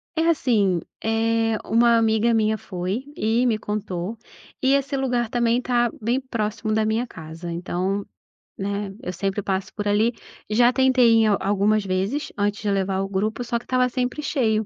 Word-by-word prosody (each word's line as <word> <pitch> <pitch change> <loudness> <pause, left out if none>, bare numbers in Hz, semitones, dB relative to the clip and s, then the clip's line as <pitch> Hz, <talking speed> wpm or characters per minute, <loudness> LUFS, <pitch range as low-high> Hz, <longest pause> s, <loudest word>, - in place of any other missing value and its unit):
É 320 0 +1
assim, 215 - +2 0.2
eh, 225 0 +1
uma 235 +1 +4
amiga 225 +1 +2
minha 220 -1 +2
foi 190 +6 -4
e 225 +3 +1
me 230 -3 +2
contou, 210 -1 -4 0.4
e 265 +1 +3
esse 275 0 0
lugar 245 -4 0
também 240 0 +1
tá 240 -1 +1
bem 235 +4 +1
próximo 215 -4 -3
da 220 0 +2
minha 225 +3 0
casa, 165 -1 -9
então, 185 +3 -2 0.5
né, 200 0 -3
eu 180 - -3
sempre 195 +3 -2
passo 190 0 -2
por 205 -1 -3
ali. 215 +4 +2 0.4
Já 240 +3 +4
tentei 255 -2 +4
em - - +3
algumas 205 +1 +2
vezes, 195 +10 -2
antes 205 +1 0
de 210 - -1
levar 195 -1 0
o 195 - -3
grupo, 215 +5 -1
só 240 0 -1
que - - -18
estava 255 -1 +2
sempre 250 +3 -2
cheio, 225 -7 +1
220 Hz, 170 wpm, -23 LUFS, 200-240 Hz, 0.5 s, uma